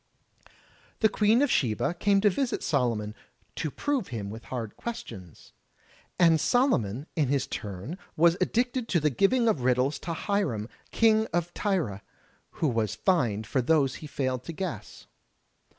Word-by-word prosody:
The 220 - +5
Queen 220 +6 +3
of 290 - +1
Sheba 115 +5 +1
came 200 +3 +2
to 210 - +5
visit 260 +6 -1
Solomon, 115 -7 0 0.4
"to 155 - -2
prove 275 - -2
him 100 -4 -5
with 115 +2 -9
hard 115 -4 -5
questions." 100 - -8 0.6
And 165 -3 +5
Solomon, 145 - +1
in 150 -4 +1
his 140 0 +1
turn 105 - -6 0.2
was 170 +1 +5
addicted 245 0 0
to 175 - +2
the 150 -1 +1
giving 230 - +2
of 210 - +2
riddles 130 +3 +1
to 165 - -4
Hiram, 155 - -1 0.2
King 220 -1 +3
of 175 0 -1
T)rre, 165 - -1 0.5
who 160 - 0
was 110 -4 0
fined 110 - +1
for 130 +5 0
those 135 0 +2
he 155 - -7
failed 130 -3 -2
to 165 - -6
guess. 155 - -6
150 Hz, 150 wpm, -27 LUFS, -, 0.6 s, The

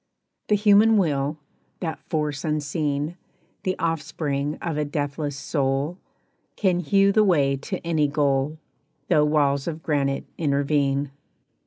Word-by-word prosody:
The 210 - +4
human 210 +2 +5
Will, 150 -5 0 0.4
that 165 -3 -4
force 150 -3 -1
unseen, 150 +1 -1 0.4
The 185 0 -2
offspring 150 -3 -2
of 170 -3 -3
a 150 - 0
deathless 145 0 -3
Soul, 140 +4 -1 0.6
Can 185 -4 +1
hew 195 +4 +3
the 215 +1 +4
way 145 -8 +3
to 185 +7 -4
any 160 -3 +2
goal, 140 0 0 0.5
Though 150 - +4
walls 140 -2 +2
of 160 -1 -4
granite 140 -3 0
intervene. 140 -2 +1
150 Hz, 125 wpm, -24 LUFS, 140-170 Hz, 0.6 s, human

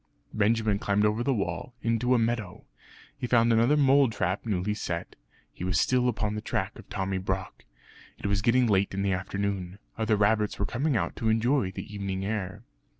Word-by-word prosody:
Benjamin 110 -1 +2
climbed 100 +1 +1
over 105 +2 +1
the 135 - +1
wall, 100 +1 -3
into 115 +2 +2
a - - +4
meadow. 115 -5 -2 0.5
He 135 -3 -4
found 115 -1 +4
another 120 +6 +4
mole 140 -2 +5
trap 100 0 -2
newly 100 0 0
set; 85 -5 -4 0.4
he - - -8
was 90 -3 +1
still 125 +5 +2
upon 105 -3 -1
the 105 - -4
track - - -3
of - - -14
Tommy 95 0 -2
Brock. 95 0 -4 0.5
It - - -10
was 100 0 +1
getting 125 +3 +3
late 100 -3 +1
in 100 - -1
the 100 -1 +1
afternoon. 95 0 -3 0.2
Other 110 -1 +2
rabbits 105 +1 +2
were 100 - -1
coming 130 +5 0
out - - -2
to 115 - 0
enjoy 115 0 +2
the 95 - -7
evening 95 -1 -3
air. 105 0 -3
105 Hz, 190 wpm, -28 LUFS, 95-115 Hz, 0.5 s, mole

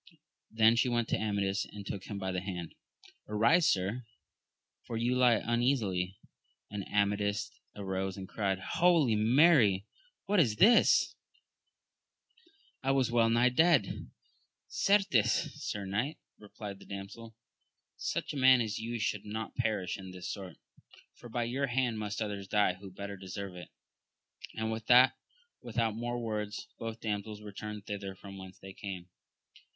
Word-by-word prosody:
Then 110 +1 +5
she 125 - +3
went 120 -1 0
to - - +1
Amadis, 100 -2 0
and 100 -1 -10
took 95 -1 -5
him 100 - -5
by 95 -1 -3
the 90 -1 -2
hand! 90 -3 -5 0.3
— - - -24
Arise, 115 +11 +4
Sir, 100 +6 -2 0.7
for 115 - -5
you 120 +2 +1
lie 125 -3 +5
un 120 +2 0
easily? 95 -8 0 0.5
and 105 -1 -4
Amadis 105 +3 0 0.2
arose 95 -1 -3
and 95 -1 -7
cried, 100 -2 -1
Holy 155 - +3
Mary! 110 - +5 0.4
what 200 0 +2
is 115 -10 +3
this? 235 - +5 1.7
I 135 - -1
was 135 -3 +2
well 115 -1 +4
nigh 120 +2 +4
dead. 145 - +2 0.6
Certes, 195 - +2
sir 100 -1 -3
knight, 110 +11 -2 0.2
replied 105 -1 -9
the - - -14
damsel, 105 +3 -8 0.6
such - - -3
a - - -5
man 130 -1 +7
as 110 -3 -2
you 115 +2 -3
should 110 -2 -1
not 110 +1 -5
perish 110 -7 -1
in 95 -1 -8
this 90 -1 -7
sort, 95 -4 -8 0.6
for 120 - -13
by 120 +1 -1
your 130 +4 -1
hand 120 -3 0
must 105 +1 -3
others 100 -2 -5
die 105 -2 +3
who 95 +2 -11
better 100 +2 -7
deserve 95 0 -7
it! 90 - -9 0.9
and 110 0 -2
with 110 0 -5
that, 125 +1 +7 0.5
without 115 -2 -1
more 120 +1 -3
words, 105 -3 -4
both 115 0 -5
damsels 105 -1 -4
returned 105 0 -7
thither 100 -2 -5
from 100 0 -10
whence 95 0 -10
they 95 0 -11
came. 95 -3 -7
105 Hz, 155 wpm, -31 LUFS, 100-120 Hz, 1.7 s, man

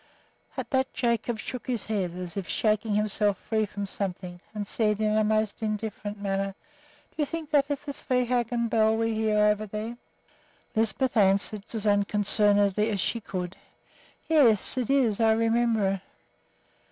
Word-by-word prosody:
At - - -5
that 265 -1 +1
Jacob 235 -1 0
shook 250 +4 -7
his 240 -5 -2
head, 195 -5 -2
as 180 +1 -5
if 195 -3 -4
shaking 215 -1 +1
himself 210 -1 +1
free 220 +1 -1
from 200 0 -5
something, 180 -2 -5
and 210 -1 -4
said 210 0 0
in 215 0 +1
a 215 - +3
most 215 0 0
indifferent 215 -1 -4
manner, 195 -1 -2 0.6
"Do - - -32
you 300 - +1
think 320 -1 -6
that 285 -1 +3
is 285 -1 -2
the 285 - -4
Svehaugen 245 -3 0
bell 220 0 +3
we 225 0 0
hear 220 -1 +1
over 210 0 +3
there?" 215 +3 -5 0.8
Lisbeth 225 +4 +1
answered 200 0 +3
as 220 -2 -3
unconcernedly 205 0 +2
as 205 -3 -1
she 230 - 0
could, 185 -2 -5 0.7
"Yes, 260 -11 +4
it 250 -3 -2
is; 250 -7 +2
I 225 -1 +4
remember 225 -2 +2
it." 195 -1 -1
215 Hz, 160 wpm, -27 LUFS, 205-235 Hz, 0.8 s, Yes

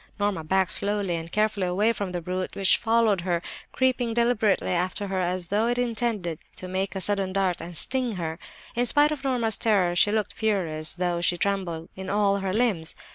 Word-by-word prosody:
"Norma 205 -5 0
backed 190 +3 +1
slowly 200 -3 -1
and 165 0 -6
carefully 210 -3 +1
away 205 +6 +2
from 200 -4 -4
the 175 -1 -3
brute, 185 +2 -4
which 195 -1 +4
followed 225 -4 +2
her, 175 -1 0 0.3
creeping 250 -3 0
deliberately 235 -5 +2
after 185 +3 -1
her 190 -1 -1
as 180 -1 -2
though 215 +3 +1
it 240 0 0
intended 225 -8 -1 0.2
to 185 - -7
make 190 +2 -2
a - - -1
sudden 195 -1 0
dart 185 -2 0
and 170 0 -4
sting 255 - +2
her. 165 -3 -4 0.4
"In 245 +1 +2
spite 295 +3 +4
of 295 -2 -4
Norma's 240 -5 +1
terror 190 -6 +2
she 205 +4 +4
looked 215 -2 -1
furious, 170 -9 -1
though 175 -1 -1
she 175 0 +2
trembled 175 -4 -2
in 190 0 -7
all 200 -1 +2
her 195 -1 -2
limbs. 200 -7 0
195 Hz, 195 wpm, -26 LUFS, 180-220 Hz, 0.4 s, which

